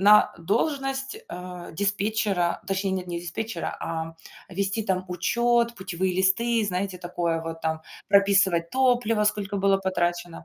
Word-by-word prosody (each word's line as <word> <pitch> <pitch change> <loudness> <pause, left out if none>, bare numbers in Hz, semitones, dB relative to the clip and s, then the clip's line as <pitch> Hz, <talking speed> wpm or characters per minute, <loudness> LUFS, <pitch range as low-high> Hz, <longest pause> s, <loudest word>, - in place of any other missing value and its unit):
на 210 +2 +6
должность, 270 - -1
а, 180 -1 -8
диспетчера, 200 -2 0
точнее, 195 0 0
нет, 185 -1 -3
не 170 -1 -3
диспетчера, 175 +2 -4
а, 165 0 -4 0.3
вести 195 +3 -1
там 185 -2 0
учёт, 235 +6 +2
путевые 185 -1 -2
листы, 225 +4 +3
знаете, 185 -1 -2
такое 175 -2 -1
вот 165 0 -6
там, 160 0 -1 0.3
прописывать 195 -4 +4
топлива 245 -5 +2
сколько 205 -1 0
было 195 0 +3
потрачено. 175 -2 -1
190 Hz, 130 wpm, -26 LUFS, 175-210 Hz, 0.3 s, на